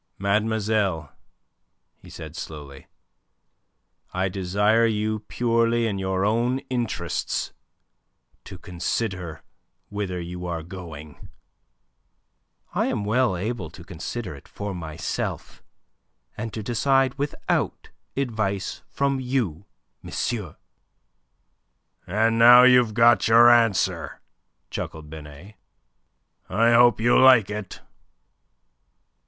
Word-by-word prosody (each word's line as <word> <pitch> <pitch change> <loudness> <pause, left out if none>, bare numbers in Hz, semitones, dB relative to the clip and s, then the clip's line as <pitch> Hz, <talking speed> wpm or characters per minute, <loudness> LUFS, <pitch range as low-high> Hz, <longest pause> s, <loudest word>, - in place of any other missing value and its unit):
"Mademoiselle," 100 -5 0 0.9
he - - -15
said, - - -9
slowly, 70 -3 -9 1.2
"I 95 +1 -1
desire 105 +5 +2
you 110 0 -1
purely 115 -1 +1
in 100 -3 -2
your 95 0 -1
own 120 +4 +1
interests 115 -9 -2 0.9
to 95 - -10
consider 90 -2 -4 0.5
whither 100 -3 -4
you 90 +1 -6
are 85 -2 -4
going." 80 -4 -10 1.4
"I - - 0
am 100 - -2
well 110 -2 +1
able 100 -2 -4
to 85 +2 -13
consider 95 +3 -6
it 70 - -14
for 100 -1 -6
myself, 80 -2 -5 0.7
and 115 +1 -5
to 110 - -6
decide 135 +3 +2
without 145 +1 -2 0.3
advice 110 -7 -2
from 140 -1 0
you, 115 - -2 0.3
monsieur." 105 -9 -4 1.5
"And 115 +4 +1
now 120 +2 +9
you've 125 -4 +5
got 120 0 +5
your 120 +2 +7
answer," 115 -4 +1 0.5
chuckled 75 -1 -6
Binet. 80 +6 -11 0.9
"I 115 +5 +3
hope 120 -2 +5
you 120 +2 +4
like 125 -6 +6
it." 105 -2 -6
105 Hz, 100 wpm, -24 LUFS, 90-115 Hz, 1.5 s, now